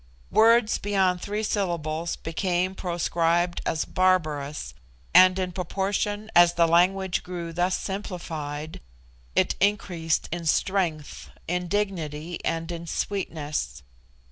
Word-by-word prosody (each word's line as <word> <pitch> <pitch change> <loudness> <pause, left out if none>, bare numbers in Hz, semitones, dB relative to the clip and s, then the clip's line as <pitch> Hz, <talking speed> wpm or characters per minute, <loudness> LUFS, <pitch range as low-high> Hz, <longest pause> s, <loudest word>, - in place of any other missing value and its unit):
Words 225 0 +4
beyond 190 -3 +1
three 210 +1 -3
syllables 170 -6 -1
became 180 +2 -1
proscribed 175 -1 0
as 160 - 0
barbarous 150 - 0 0.4
and 185 +1 +7
in 185 -1 -1
proportion 200 +4 -2
as 175 0 +7
the 170 - +4
language 185 +2 +2
grew 170 -2 -6
thus 180 +2 +1
simplified 160 -6 -5 0.5
it - - +3
increased 180 -5 0
in 170 -1 -3
strength, 165 -3 -1 0.2
in 180 +1 -1
dignity, 170 -5 -3
and 165 +1 -2
in 170 0 -6
sweetness. 150 - -3
175 Hz, 110 wpm, -26 LUFS, 165-190 Hz, 0.5 s, and